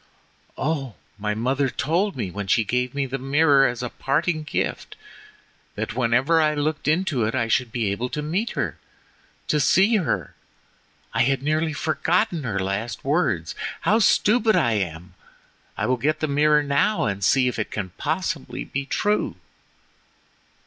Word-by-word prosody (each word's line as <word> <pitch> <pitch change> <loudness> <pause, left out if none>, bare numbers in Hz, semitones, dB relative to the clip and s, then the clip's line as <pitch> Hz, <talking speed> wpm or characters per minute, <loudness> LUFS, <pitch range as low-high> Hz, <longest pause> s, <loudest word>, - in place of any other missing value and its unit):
"Oh! 135 -5 -2 0.2
my 105 0 -1
mother 130 +4 0
told 170 - 0
me 105 -8 -3
when 100 +1 -5
she 115 - +3
gave 125 +4 -1
me 140 -1 0
the 135 +1 -4
mirror 140 +1 +4
as 120 0 -4
a 120 - -3
parting 155 +6 -1
gift, 150 - -3 0.8
that - - -3
whenever 130 +7 +3
I 155 -1 +2
looked 150 0 -2
into 155 -6 +1
it 110 - -2
I 120 -3 0
should 120 0 +1
be 110 -4 -1
able 120 +5 -3
to 150 - -4
meet 185 +10 -1
her—to 150 - -5
see 195 +10 +4
her. 180 - -2 0.8
I - - +2
had 135 +1 +1
nearly 155 +2 +1
forgotten 160 +2 0
her 110 -5 -2
last 100 +5 -3
words—how 140 - 0
stupid 220 +1 +3
I 120 - +3
am; 90 -4 -3 0.6
I - - -1
will 130 0 +1
get 155 +5 0
the 155 - -1
mirror 150 +1 +3
now 140 +9 +1
and 100 -1 -2
see 130 +4 +4
if 125 - -2
it 105 - -2
can 95 -3 -4
possibly 160 -1 -2
be 140 0 -4
true!" 210 +7 0
140 Hz, 155 wpm, -23 LUFS, 115-155 Hz, 0.8 s, mirror